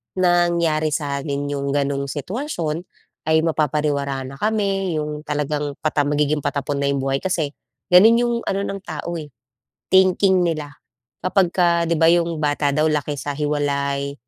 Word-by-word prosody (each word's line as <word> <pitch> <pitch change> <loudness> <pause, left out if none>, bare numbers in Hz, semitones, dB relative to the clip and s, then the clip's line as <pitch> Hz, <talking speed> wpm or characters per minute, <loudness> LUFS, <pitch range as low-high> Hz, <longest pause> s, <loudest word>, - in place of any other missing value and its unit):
nangyari 170 -3 +2
sa 140 -3 -2
amin 145 0 -3
yung 140 -1 -2
ganong 140 -1 0
sitwasyon 170 - -3 0.5
ay 160 0 +4
mapapariwara 150 -3 0
na 135 - -9
kami. 195 -4 0
Yung 150 0 -4
talagang 150 -1 -2
pata 150 -2 +1
magiging 150 +1 +1
patapon 140 0 -2
na 140 - +1
yung 140 -1 -1
buhay. 135 0 0
Kasi, 165 -6 -1 0.4
ganun 210 +6 +8
yung 240 -1 +1
ano 195 0 0
ng 195 0 -4
tao, 165 0 -5
eh, 150 - -8 0.6
thinking 190 0 +4
nila, 155 -4 -2 0.5
'kapagka 175 -2 +2
'di 165 - +1
ba, 165 - +4
yung 170 -1 +1
bata 145 -1 +1
daw 150 +2 +1
laki 150 -1 -1
sa 145 +2 -4
hiwalay, 140 -1 -1
150 Hz, 150 wpm, -21 LUFS, 145-175 Hz, 0.6 s, ganun